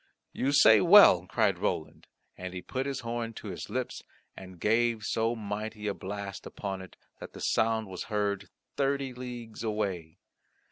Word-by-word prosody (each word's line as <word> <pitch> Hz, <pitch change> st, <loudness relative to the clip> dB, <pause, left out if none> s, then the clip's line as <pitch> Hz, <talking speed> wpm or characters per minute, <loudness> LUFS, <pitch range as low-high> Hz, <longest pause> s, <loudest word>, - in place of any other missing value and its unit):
"You 135 Hz, -, 0 dB
say 110 Hz, -7 st, +7 dB
well," -, -, +8 dB
cried -, -, +1 dB
Roland, -, -, -3 dB, 0.3 s
and 90 Hz, 0 st, -7 dB
he 90 Hz, -, -6 dB
put 130 Hz, +1 st, -3 dB
his 140 Hz, -, -3 dB
horn 115 Hz, -1 st, -3 dB
to 110 Hz, -, -8 dB
his 90 Hz, -, -6 dB
lips, 130 Hz, -1 st, -3 dB, 0.3 s
and 95 Hz, -2 st, -11 dB
gave 115 Hz, +2 st, +2 dB
so 115 Hz, +3 st, 0 dB
mighty 105 Hz, 0 st, -5 dB
a 100 Hz, -, 0 dB
blast 100 Hz, 0 st, -6 dB
upon 95 Hz, -2 st, -5 dB
it, 95 Hz, -, -12 dB, 0.2 s
that -, -, -9 dB
the -, -, -10 dB
sound 110 Hz, 0 st, +1 dB
was 95 Hz, -2 st, -6 dB
heard 100 Hz, -3 st, -2 dB, 0.3 s
thirty 140 Hz, -1 st, 0 dB
leagues 120 Hz, -3 st, -7 dB
away. 100 Hz, -7 st, -3 dB
110 Hz, 160 wpm, -29 LUFS, 100-120 Hz, 0.3 s, well